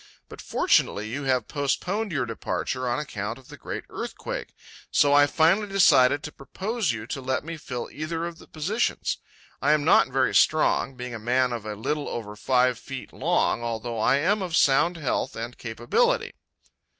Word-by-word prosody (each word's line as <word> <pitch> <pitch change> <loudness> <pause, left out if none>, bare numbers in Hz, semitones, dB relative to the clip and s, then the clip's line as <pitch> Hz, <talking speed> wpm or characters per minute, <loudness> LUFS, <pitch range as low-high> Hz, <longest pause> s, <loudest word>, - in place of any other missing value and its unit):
But - - -10
fortunately 105 +1 +1
you 140 +4 -4
have 130 -2 +1
postponed 180 +9 -1
your 140 -6 0
departure 125 +2 -3
on 120 - 0
account 110 -6 -4
of 130 - -17
the - - -9
great - - -6
earthquake, - - -6 0.3
so 145 -1 +4
I 145 0 +6
finally 170 +7 +3
decided 145 -8 +5
to 150 - -6
propose 190 - -2
you 110 -2 -5
to 135 +3 -5
let 130 0 -1
me 165 +2 -6
fill 125 -6 -5
either 165 +2 -3
of 170 -1 -7
the - - -15
positions. 195 +10 -1 0.4
I 145 +2 +4
am 150 -1 +1
not - - +6
very - - +1
strong, 135 - +3
being 125 0 -6
a 115 - -5
man 125 +2 +1
of 110 -2 -5
a 105 - -4
little 145 +7 -2
over 105 -3 -5
five 125 +1 +2
feet 135 -1 -8
long, 115 - +1
although 115 0 -3
I 110 - +4
am 190 +9 +1
of 175 -3 -2
sound 165 +4 +4
health 145 -6 -2
and 115 +2 -5
capability." 120 0 0
135 Hz, 180 wpm, -25 LUFS, 120-160 Hz, 0.4 s, I